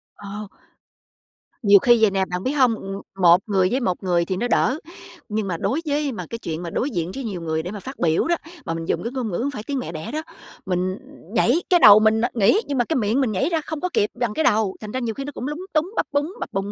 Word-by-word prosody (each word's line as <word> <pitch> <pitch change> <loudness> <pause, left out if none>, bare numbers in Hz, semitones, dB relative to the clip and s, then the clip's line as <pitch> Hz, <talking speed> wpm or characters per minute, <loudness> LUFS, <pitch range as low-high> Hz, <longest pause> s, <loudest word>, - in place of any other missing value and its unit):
Ờ. 205 +1 -7 1.1
Nhiều 200 -3 +7
khi 240 +2 +4
vậy 220 -2 +5
nè, 190 -1 +1
bạn 180 0 -4
biết 260 - 0
hông? 255 -6 +3
Ừm, 195 -1 -6 0.2
một 175 0 +7
người 190 -3 +2
với 255 - +1
một 190 -6 -2
người 175 -2 +1
thì 185 +1 -2
nó 240 - -1
đỡ, 255 +3 +2 0.5
nhưng 210 -1 -2
mà 175 -3 -2
đối 285 - -1
với 290 -1 0
mà 230 - -6
cái 230 - -4
chuyện 165 -5 -5
mà 170 - -4
đối 255 +11 -1
diện 175 - -3
với 270 - -4
nhiều 200 -7 -4
người 160 -1 -2
để 180 - -5
mà 210 - -6
phát 265 +7 -9
biểu 160 - +2
đó, 345 - +3 0.3
mà 165 - -2
mình 165 0 -4
dùng - - -1
cái 235 - -3
ngôn 255 -4 -3
ngữ 175 - -2
hổng 275 +4 -1
phải 215 -6 -6
tiếng 275 +3 -3
mẹ 245 - -5
đẻ 160 -1 -6
đó, 310 - -2 0.4
mình 185 +1 -1 0.4
nhảy 250 +8 +3
cái 355 - +5
đầu 210 -7 +9
mình 220 +1 +3
nó 240 - +2
nghĩ, 235 - +4
nhưng 280 - -2
mà 245 - +3
cái 320 - -1
miệng 230 +3 +1
mình 245 -5 +1
nhảy 190 - 0
ra 325 -2 0
không 310 0 -6
có 365 - -1
kịp 205 - +2
bằng 240 -3 -1
cái 315 - 0
đầu, 215 -9 +2
thành 210 - -7
ra 255 - -2
nhiều 235 -3 -2
khi 275 - -5
nó 290 - -5
cũng 255 - -5
lúng 310 +6 -5
túng, 315 +4 +1
bắp - - 0
búng, 290 +5 -1
bập - - -6
bùng 195 +1 -2
220 Hz, 285 wpm, -22 LUFS, 190-270 Hz, 1.1 s, đầu